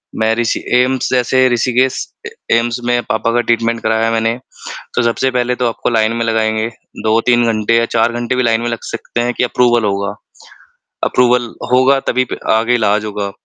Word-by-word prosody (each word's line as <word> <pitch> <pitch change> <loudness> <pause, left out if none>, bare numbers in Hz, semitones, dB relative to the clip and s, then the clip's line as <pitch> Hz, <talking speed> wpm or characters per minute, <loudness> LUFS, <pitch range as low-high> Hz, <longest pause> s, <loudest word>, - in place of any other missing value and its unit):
मैं 110 0 +1
ऋषि 115 -1 0
एम्स, 125 +1 +2
जैसे 130 +1 +3
ऋषिकेश 125 +2 0 0.2
ए - - -11 0.2
एम्स 120 +1 -1
में 120 0 +1
पापा 110 +1 0
का 120 - +2
ट्रीटमेंट 115 0 0
कराया 110 +1 +1
मैंने। 115 +1 0 0.6
तो - - +2
सबसे 120 +3 0
पहले 125 0 0
तो 125 0 0
आपको 115 - -2
लाइन 110 -1 +1
में 115 - -1
लगाएँगे। 110 -1 0 0.4
2-3 115 +2 +2
घंटे 110 +1 +1
या 115 - +2
4 115 0 +1
घंटे 120 +1 -2
भी 125 - +1
लाइन 115 -1 +1
में 120 - -2
लग 115 - -3
सकते 120 - -4
हैं 120 +1 -1
कि - - -1
अप्रूवल 120 -1 +2
होगा। 100 0 -2 0.9
अप्रूवल 125 -1 +2 0.2
होगा, 130 +2 +4
तभी 130 -1 0
प - - -5 0.2
आगे 115 +2 +2
इलाज 105 -2 +1
होगा, 100 -1 -4
115 Hz, 185 wpm, -15 LUFS, 110-125 Hz, 0.9 s, होगा